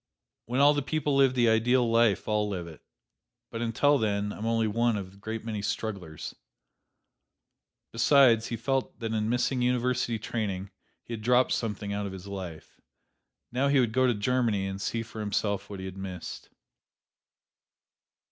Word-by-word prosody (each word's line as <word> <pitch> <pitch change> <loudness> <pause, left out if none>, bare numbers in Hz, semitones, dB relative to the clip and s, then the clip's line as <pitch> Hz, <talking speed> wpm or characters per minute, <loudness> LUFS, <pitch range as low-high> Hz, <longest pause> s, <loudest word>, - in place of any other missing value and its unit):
"When 125 +4 +1
all 145 +1 +7
the 145 - 0
people 145 0 -1
live 135 -2 +4
the 120 -2 +3
ideal 120 +2 +3
life, 115 -3 +3
I'll 105 -1 +1
live 90 -4 -4
it; 80 -2 -12 0.7
but 115 - -4
until 135 +5 +3
then 105 -2 0
I'm 110 - -5
only 115 -1 +2
one 115 +1 +1
of 95 -2 -6
the 100 - -18
great 110 +2 -6
many 110 -3 -3
strugglers." 100 -7 -4 1.6
Besides, 115 -2 +5
he 115 - -3
felt 135 +3 -1
that 115 -2 -3
in 110 0 0
missing 125 +1 +1
university 125 -1 +1
training 100 -3 -3 0.3
he 120 - -7
had 110 - -5
dropped 125 +3 +3
something 105 -2 -2
out 100 0 -2
of 95 - -7
his 95 0 -9
life. 95 -5 -8 0.7
Now 130 +3 +1
he 140 -1 +4
would 120 -3 +1
go 130 +1 +3
to 120 - +2
Germany 110 -2 +1
and 95 0 -4
see 115 +3 -2
for 110 -1 -10
himself 100 -1 -1
what 100 - -6
he 95 - -6
had 95 0 -7
missed. 95 -3 -7
110 Hz, 170 wpm, -28 LUFS, 100-125 Hz, 1.6 s, all